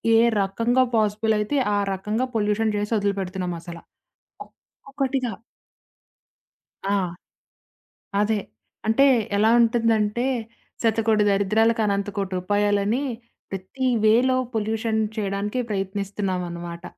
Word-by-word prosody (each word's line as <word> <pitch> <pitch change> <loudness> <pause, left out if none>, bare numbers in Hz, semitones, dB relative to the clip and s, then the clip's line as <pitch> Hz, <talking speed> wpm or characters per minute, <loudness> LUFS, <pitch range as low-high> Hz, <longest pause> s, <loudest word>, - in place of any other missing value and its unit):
ఏ - - +7 0.2
రకంగా 230 +6 +2
పాజిబుల్ 215 0 +2
అయితే 210 +8 -1 0.2
ఆ - - +2 0.2
రకంగా 210 +6 -1
పొల్యూషన్ 215 0 +1
చేసి, 205 +1 -3
వదిలుపెడుతున్నాం 190 -3 -2
అసలా. 170 -1 -9 1.1
ఒక్కొక్కటిగా 270 -3 -1 1.6
ఆ! - - +3 1.3
అదే. 210 +1 +2 0.5
అంటే 225 +5 +4 0.3
ఎలా 215 +2 +4
ఉంటుందంటే, 230 -1 +2 0.6
శతకోటి 220 -1 +2
దరిద్రాలకు 215 +3 +2
అనంత 200 0 0
కోటి 195 -2 -2
ఉపాయలని, 205 +5 +1 0.5
ప్రతి 195 +8 -3 0.2
వేలో 250 +4 +4 0.2
పొల్యూషన్ 220 0 -1 0.2
చేయడానికి 205 +3 -2
ప్రయత్నిస్తున్నామనమాట. 185 -4 -3
210 Hz, 90 wpm, -24 LUFS, 200-225 Hz, 1.6 s, ఏ